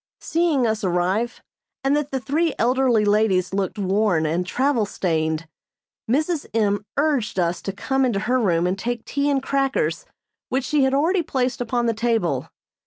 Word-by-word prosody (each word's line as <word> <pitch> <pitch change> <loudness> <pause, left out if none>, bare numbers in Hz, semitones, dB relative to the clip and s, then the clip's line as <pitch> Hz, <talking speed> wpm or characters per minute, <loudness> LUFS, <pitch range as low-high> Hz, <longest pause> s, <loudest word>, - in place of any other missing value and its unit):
Seeing 320 -6 +1
us 220 -1 -1
arrive, 185 +6 0 0.4
and 270 +1 +2
that 295 -1 -1
the 270 - -2
three 300 +6 0
elderly 245 -2 +2
ladies 205 -3 +2
looked 195 +1 -1
worn 195 -4 +1
and 170 +4 -1
travel 255 -2 +1
stained, 160 -4 -1 0.6
Mrs. 305 +5 0
M. 205 -2 +1
urged 285 -9 +1
us 175 -1 0
to 195 - -3
come 265 +7 -1
into 230 -6 +1
her 250 +4 +1
room 175 -6 +2
and 185 +2 -1
take 240 +2 -3
tea 285 0 0
and 275 -2 +1
crackers 275 - 0 0.4
which 260 +1 0
she 285 0 +2
had 265 0 +1
already 340 +6 +2
placed 255 -6 -1
upon 240 0 0
the 230 - +2
table. 220 - 0
235 Hz, 170 wpm, -22 LUFS, 195-270 Hz, 0.6 s, and